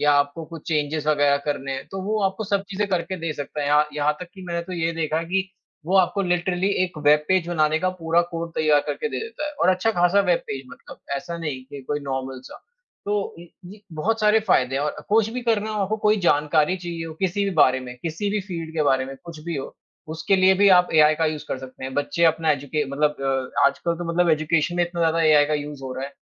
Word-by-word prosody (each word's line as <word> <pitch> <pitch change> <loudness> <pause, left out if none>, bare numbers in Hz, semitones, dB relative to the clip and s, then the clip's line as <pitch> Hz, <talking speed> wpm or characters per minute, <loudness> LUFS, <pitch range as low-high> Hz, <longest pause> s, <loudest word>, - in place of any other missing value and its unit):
या 145 0 +4
आपको 145 +3 +1
कुछ 165 -2 -11
चेंजेज़ 150 0 -1
वगैरह 145 -1 +3
करने 140 -2 -2
हैं 135 - -5
तो 190 - -5
वो 215 +2 -1
आपको 190 +3 -1
सब 200 -1 0
चीज़ें 200 +1 -1
करके 185 0 -1
दे 165 -1 -2
सकता 145 0 -6
है। 145 - -1
यहा 150 +1 +4
यहाँ 150 0 +2
तक 180 - -7
कि 190 - -11
मैंने 170 0 -2
तो 185 - -9
ये 165 -1 -1
देखा 160 -1 -1
है 165 - -3
कि, 190 +2 -1 0.4
वो 190 +2 +2
आपको 185 +2 +2
लिटरली 180 +1 0 0.2
एक 175 -3 -8
वेब 150 +1 +5
पेज 185 -2 +2
बनाने 155 -2 +2
का 185 - 0
पूरा 165 +1 +3
कोड 165 0 -4
तैयार 155 -2 +3
करके 455 - -2
दे - - -4
देता 445 -9 -5
है 300 - -5
और 175 - +3
अच्छा 185 +4 +3
खासा 175 +2 +3
वेब 175 -2 +3
पेज 135 -1 -5
मतलब - - -13 0.2
ऐसा 170 +4 -5
नहीं 150 -6 -4
कि 140 +1 -9
कोई 145 0 -1
नॉर्मल 130 -2 -4
सा। - - -11 0.5
तो 205 0 -2
इ 175 - -12 0.3
उ, - - -12 0.2
बहुत 225 +8 0
सारे 215 +1 +4
फायदे 130 -6 +3
हैं 140 - 0
और 150 - -4
कुछ 220 +1 +3
भी 250 - -3
करना 220 -2 0
हो 215 -1 -2
आपको 210 +3 -1
कोई 210 - +5
जानकारी 150 +1 +2
चाहिए 170 -2 -5
हो 160 - -8
किसी 195 +2 0
भी 200 - 0
बारे 130 -4 +4
में, 125 -1 -9
किसी 170 +5 -2
भी 210 0 0
फील्ड 170 -4 -6
के 155 - +1
बारे 135 -3 +2
में 135 - -8
कुछ 165 -2 -9
भी 170 -3 -3
हो, 135 - -6 0.3
उसके 165 +5 +1
लिए 190 0 +5
भी 200 +1 +5
आप 180 - +2
एआई 155 0 +6
का 160 +1 +1
यूज़ 155 -1 -3
कर 130 - -3
सकते 130 0 -10
हैं। 130 - -5
बच्चे 170 +4 0
अपना 160 -1 +3
एजुके 145 +1 -1
मतलब 150 +1 +1
अ, 135 -1 0
आजकल 170 +4 -1
तो 175 - -5
मतलब 175 -1 +3
एजुकेशन 155 +2 +1
में 175 - +3
इतना 175 0 -5
ज़्यादा 165 0 +2
एआई 155 -2 +6
का 155 - 0
यूज़ 145 -1 -5
हो 130 -1 -5
रहा 130 +1 -4
है 140 - -12
165 Hz, 255 wpm, -23 LUFS, 145-185 Hz, 0.5 s, एआई